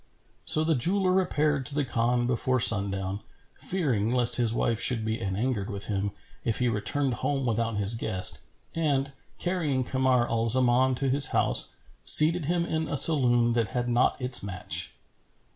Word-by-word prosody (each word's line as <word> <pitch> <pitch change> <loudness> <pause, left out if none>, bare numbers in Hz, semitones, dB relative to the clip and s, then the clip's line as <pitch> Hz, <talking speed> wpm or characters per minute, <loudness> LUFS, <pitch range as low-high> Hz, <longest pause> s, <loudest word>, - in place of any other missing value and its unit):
So 155 - +1
the 160 +1 0
jeweller 185 +7 0
repaired 150 -6 -1
to 140 - -1
the 145 -2 -1
Khan 120 0 -1
before 130 +1 -1
sundown, 100 -3 +4 0.3
fearing 125 - -2
lest 125 -1 +3
his 120 -3 0
wife 115 -1 -2
should 115 -3 +1
be 110 +1 -4
anangered 105 +1 -4
with 100 -2 -7
him, 100 -1 -3 0.3
if 115 - -2
he 125 - -1
returned 130 +5 -2
home 135 +4 -3
without 115 -2 -3
his 100 +2 +1
guest; 110 -5 0 0.3
and, 140 -4 -2 0.3
carrying 160 -8 -3
Kamar 130 -1 -1
al 115 0 -2
Zaman 130 +2 +1
to 135 +2 -4
his 140 +1 +4
house, - - 0 0.3
seated 160 +1 +7
him 170 +2 -2
in 160 -1 -4
a 145 - -3
saloon 120 -5 +4
that 115 -2 -1
had 120 0 -3
not 120 +1 0
its 125 -1 0
match. 95 -2 -3
125 Hz, 165 wpm, -25 LUFS, 115-145 Hz, 0.3 s, seated